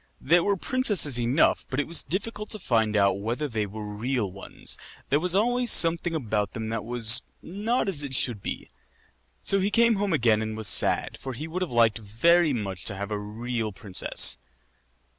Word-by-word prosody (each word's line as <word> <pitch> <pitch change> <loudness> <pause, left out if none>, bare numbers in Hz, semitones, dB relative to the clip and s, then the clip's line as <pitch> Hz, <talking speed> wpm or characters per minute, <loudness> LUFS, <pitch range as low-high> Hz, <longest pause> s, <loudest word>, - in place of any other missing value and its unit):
There 170 +5 +2
were 200 -1 0
princesses 200 - 0
enough, 120 +6 +1
but 130 - -3
it 145 - 0
was 170 - +3
difficult 210 +3 -4
to 215 - 0
find 110 - 0
out 100 -1 +2
whether 120 +8 -3
they 110 -5 -3
were 105 +2 -8
real 105 0 -3
ones. 95 +1 -4 0.4
There 145 - +3
was 180 +2 0
always 245 +3 +2
something 165 0 +4
about 105 - -2
them 110 -1 -5
that 115 -1 -4
was 115 +1 +5 0.2
not 210 +7 -2
as 175 -7 -2
it 140 -2 -4
should 120 -5 0
be. - - -6 0.7
So 195 - +2
he 195 +1 0
came 230 +1 +3
home 200 0 -1
again 115 -8 +2
and 110 0 -5
was 110 -2 0
sad, - - +3
for 130 - -7
he 150 +7 -7
would 175 +3 -5
have 180 - -2
liked 115 -2 +2
very 155 +11 +2
much 100 -8 -4
to 100 - -1
have 100 +2 -6
a 105 - -2
real 110 +2 -4
princess. 95 - +2
125 Hz, 195 wpm, -25 LUFS, 110-175 Hz, 0.7 s, was